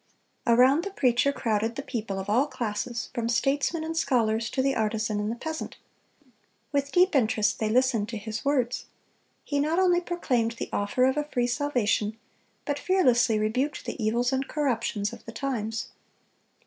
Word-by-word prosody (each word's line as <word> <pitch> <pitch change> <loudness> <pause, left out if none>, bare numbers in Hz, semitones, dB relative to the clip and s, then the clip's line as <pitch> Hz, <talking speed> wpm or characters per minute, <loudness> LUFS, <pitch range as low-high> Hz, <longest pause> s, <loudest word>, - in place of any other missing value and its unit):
(250) 235 0 +4
Around 270 +6 +5
the 395 0 -7
preacher 250 +1 +3
crowded 225 -3 -1
the 280 - -4
people 215 -7 -4
of 190 +1 -5
all 245 +8 +3
classes, 240 -2 -4
from 235 -1 -2
statesmen 280 +7 +1
and 325 +1 -4
scholars 230 -7 +1
to - - -4
the 275 0 +2
artisan 215 -1 -1
and 210 0 -1
the - - -3
peasant. 315 +6 -5 0.9
With 280 -1 0
deep 365 +1 +4
interest 220 -4 +2
they 220 - 0
listened 235 -2 +2
to 230 - -4
his 220 +1 -5
words. 260 -3 0 0.6
He 285 - -1
not 310 +4 +1
only 360 -2 +4
proclaimed 255 -10 0
the 235 - -6
offer 205 +5 +1
of 265 +2 +2
a 295 - 0
free 245 -5 0
salvation, 240 -5 0 0.5
but 290 -2 -2
fearlessly 250 - +3
rebuked 250 +7 -1
the 235 - -4
evils 240 +4 +1
and 265 +1 -1
corruptions 230 -8 -1
of - - -11
the 230 - -7
times. 225 -4 -3
245 Hz, 175 wpm, -27 LUFS, 220-285 Hz, 0.9 s, Around